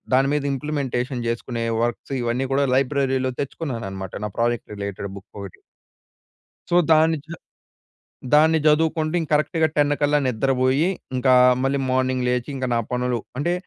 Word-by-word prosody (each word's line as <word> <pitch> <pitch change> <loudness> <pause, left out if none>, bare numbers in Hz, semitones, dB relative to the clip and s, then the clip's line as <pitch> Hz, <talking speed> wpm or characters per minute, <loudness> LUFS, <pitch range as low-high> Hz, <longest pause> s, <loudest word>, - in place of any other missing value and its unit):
దాని 135 +1 +3
మీద 150 - 0
ఇంప్లిమెంటేషన్ 135 -3 -3
జేసుకునే 115 0 -3 0.2
వర్క్స్ 120 +3 -3
ఇవన్నీ 120 +3 -1
గూడా 140 +1 +2
లైబ్రరీలో 135 -1 +1
తెచ్చుకున్నానన్నమాట. 115 - -5
నా - - -3
ప్రాజెక్ట్ 120 -2 -1
రిలేటెడ్ 100 -1 -5
బుక్ 100 - -14
ఒకటి. 100 -2 -10 1.1
సో, 175 - +3 0.2
దాన్ని 160 +1 +4
జ 165 - -9 1.0
దాన్ని 160 +2 +5
జదువుకుంటూ 155 +1 +2
ఇం 165 - -2
కరెక్ట్‌గా 160 +2 +2
10 145 0 +3
కల్లా 145 0 +3
నిద్రబోయి, 130 +5 +1 0.3
ఇంకా 130 0 +3 0.3
మళ్ళీ 135 +1 +1
మార్నింగ్ 130 0 0
లేచి 125 +2 -1
ఇంక 130 -1 -2
నా 115 - +2
పనులు 125 -1 -1 0.2
అంటే, 170 +5 0
130 Hz, 140 wpm, -22 LUFS, 120-150 Hz, 1.1 s, దాన్ని